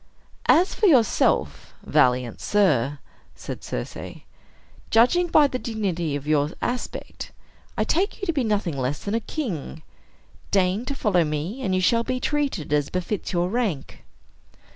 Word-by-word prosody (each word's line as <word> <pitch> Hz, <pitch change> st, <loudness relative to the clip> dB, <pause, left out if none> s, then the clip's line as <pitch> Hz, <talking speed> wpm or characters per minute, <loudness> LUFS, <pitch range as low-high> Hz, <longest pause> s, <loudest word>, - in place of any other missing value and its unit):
"As 360 Hz, +3 st, +4 dB
for 425 Hz, -, +2 dB
yourself, 255 Hz, -, +2 dB
valiant 125 Hz, -2 st, +2 dB
sir," 145 Hz, -, +2 dB, 0.4 s
said -, -, -7 dB
Circe, -, -, -6 dB, 0.7 s
"judging 250 Hz, +11 st, +4 dB
by 305 Hz, -3 st, +5 dB
the 255 Hz, -3 st, -2 dB
dignity 185 Hz, -, -2 dB
of 145 Hz, 0 st, -5 dB
your 150 Hz, -1 st, +2 dB
aspect, 245 Hz, 0 st, -5 dB, 0.5 s
I -, -, +2 dB
take 380 Hz, +6 st, 0 dB
you 395 Hz, -, -3 dB
to 335 Hz, -, 0 dB
be 275 Hz, -4 st, 0 dB
nothing 205 Hz, -8 st, 0 dB
less 135 Hz, +2 st, -2 dB
than 200 Hz, -, -3 dB
a 230 Hz, -, +2 dB
king. 185 Hz, -, -5 dB, 0.7 s
Deign 195 Hz, +4 st, +1 dB
to 280 Hz, -, -3 dB
follow 200 Hz, -9 st, +2 dB
me, 155 Hz, -, -3 dB
and 190 Hz, -7 st, 0 dB
you 185 Hz, -, +1 dB
shall 230 Hz, +5 st, +3 dB
be 255 Hz, +1 st, -2 dB
treated 275 Hz, -, -1 dB
as 145 Hz, -1 st, +1 dB
befits 185 Hz, +2 st, -3 dB
your 175 Hz, -1 st, 0 dB
rank." 205 Hz, -, -3 dB
200 Hz, 150 wpm, -24 LUFS, 155-250 Hz, 0.7 s, by